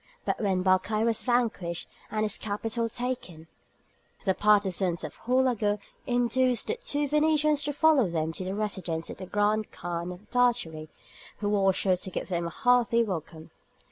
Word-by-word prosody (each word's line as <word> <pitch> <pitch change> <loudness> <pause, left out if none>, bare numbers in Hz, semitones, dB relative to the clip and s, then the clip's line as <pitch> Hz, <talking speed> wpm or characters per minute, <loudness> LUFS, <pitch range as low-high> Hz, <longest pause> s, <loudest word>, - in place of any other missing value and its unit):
But - - -1
when 190 -3 +1
Barkaï 195 +4 +2
was 230 -2 +1
vanquished 225 -9 0 0.2
and 215 0 -1
his 215 - -1
capital 225 +2 -2
taken, 240 -10 -4 0.8
the 190 - +3
partisans 190 -4 +2
of - - -6
Houlagou 245 -5 +2 0.3
induced 245 0 +2
the 455 - -2
two 290 -11 0
Venetians 300 0 +3
to 290 - 0
follow 290 - +4
them 160 -1 -1
to 185 - -5
the 190 +1 -3
residence 185 -6 -3
of - - -9
the 185 - -8
grand 210 +2 +1
Khan 175 0 -4
of 180 +4 -11
Tartary, 230 -11 +1 0.5
who 205 - -2
was 195 -2 +3
sure 185 -2 +2
to 190 - -6
give 185 - -5
them 170 -2 -1
a - - -3
hearty 245 -1 +3
welcome. 165 -5 -6
210 Hz, 165 wpm, -28 LUFS, 185-245 Hz, 0.8 s, follow